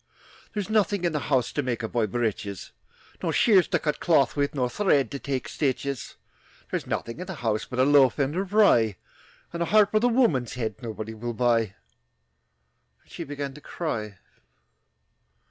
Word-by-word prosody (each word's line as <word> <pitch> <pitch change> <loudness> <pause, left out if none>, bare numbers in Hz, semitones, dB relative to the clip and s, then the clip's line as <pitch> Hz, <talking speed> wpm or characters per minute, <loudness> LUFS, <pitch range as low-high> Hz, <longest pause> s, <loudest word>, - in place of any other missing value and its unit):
"There's 205 -2 -2
nothing 205 -3 +1
in 170 - +2
the 150 -1 -3
house 130 -4 +2
To 145 - -1
make 125 -3 -3
a - - -1
boy 115 -1 0
breeches, 105 -3 -3 0.5
Nor - - 0
shears 195 -7 +5
to - - +1
cut 150 - -2
a - - -31
cloth 155 -6 +3
with 145 +1 0
Nor 125 -3 +1
thread 140 - +1
to 140 - -4
take 135 -2 -3
stitches. 135 -2 -2 0.6
"There's - - -3
nothing 115 +6 -4
in 180 - -6
the 190 - -5
house 110 -1 0
But 125 - -7
a 130 - +4
loaf 140 -3 +5
end 140 +1 0
of 190 +1 -2
rye, 120 - +4 0.6
And 170 - -4
a - - +2
harp 210 -1 +4
with 215 +1 +3
a - - +5
woman's 225 - +2
head 110 -3 -4
Nobody 110 -1 -6
will 120 +2 -5
buy," 115 -4 +1 1.3
And - - -25
she - - -6
began 140 -1 -5
to 150 - -13
cry. 110 - -4
135 Hz, 185 wpm, -26 LUFS, 115-170 Hz, 1.3 s, shears